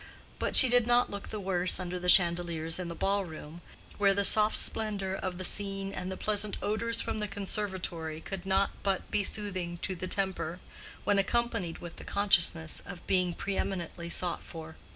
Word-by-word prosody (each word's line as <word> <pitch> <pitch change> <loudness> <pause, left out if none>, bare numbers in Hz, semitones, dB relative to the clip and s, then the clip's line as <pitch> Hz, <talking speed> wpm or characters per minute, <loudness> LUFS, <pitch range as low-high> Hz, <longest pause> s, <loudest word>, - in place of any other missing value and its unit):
But - - -1
she 260 - +8
did 245 -1 +3
not 245 0 +3
look 200 -1 -6
the 215 - -5
worse 185 -2 +2
under 180 0 -4
the 180 0 -1
chandeliers 170 -2 +4
in 180 - -4
the 170 - -6
ball 195 +3 0
room, 160 -1 -10 0.4
where 200 -1 +4
the 200 0 +1
soft 215 +1 +5
splendor 205 -4 -1
of 185 -2 -4
the 185 - -5
scene 195 0 0
and 185 +1 -5
the 190 - -5
pleasant 210 -1 0
odors 230 +2 +1
from - - -2
the 210 - -1
conservatory 190 -5 -3
could 185 +2 -7
not 195 +1 +1
but 195 -2 -2
be 205 - +1
soothing 185 -4 -3
to 190 - -1
the 185 +1 -5
temper, 180 -3 -2 0.4
when 205 -1 +2
accompanied 230 -4 -1
with 175 -1 -10
the - - -9
consciousness 170 -5 +3
of 175 - -10
being 180 -2 +1
preeminently 180 -3 -4
sought 175 0 -2
for. 160 -1 -9
190 Hz, 185 wpm, -30 LUFS, 175-205 Hz, 0.4 s, she